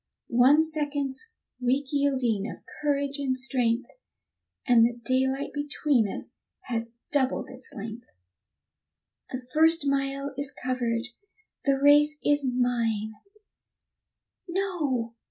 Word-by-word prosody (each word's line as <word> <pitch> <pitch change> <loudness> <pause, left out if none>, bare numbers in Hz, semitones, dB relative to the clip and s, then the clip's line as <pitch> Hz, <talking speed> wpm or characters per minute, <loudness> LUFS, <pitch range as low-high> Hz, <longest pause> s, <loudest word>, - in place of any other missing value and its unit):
One 260 +6 +5
second's 290 +1 -1 0.3
weak 265 +3 0
yielding 255 -7 +1
of - - -10 0.2
courage 285 -1 0
and 265 -2 0
strength, 250 -2 0 0.8
And 240 -3 +6
the 235 +1 +3
daylight 265 +2 0
between 290 -5 +1
us - - -5 0.3
has 230 -1 -3 0.2
doubled 270 -3 +1
its 255 -1 -6
length. 225 +2 -8 1.2
The 255 -1 -6
first 320 0 +5
mile 275 0 -1
is 280 0 -1
covered, 245 -2 -2 0.6
the 275 -1 +2
race 295 +2 +5
is 290 -1 +3
mine 235 -4 0 1.3
no! 325 -11 -1
265 Hz, 105 wpm, -27 LUFS, 245-285 Hz, 1.3 s, And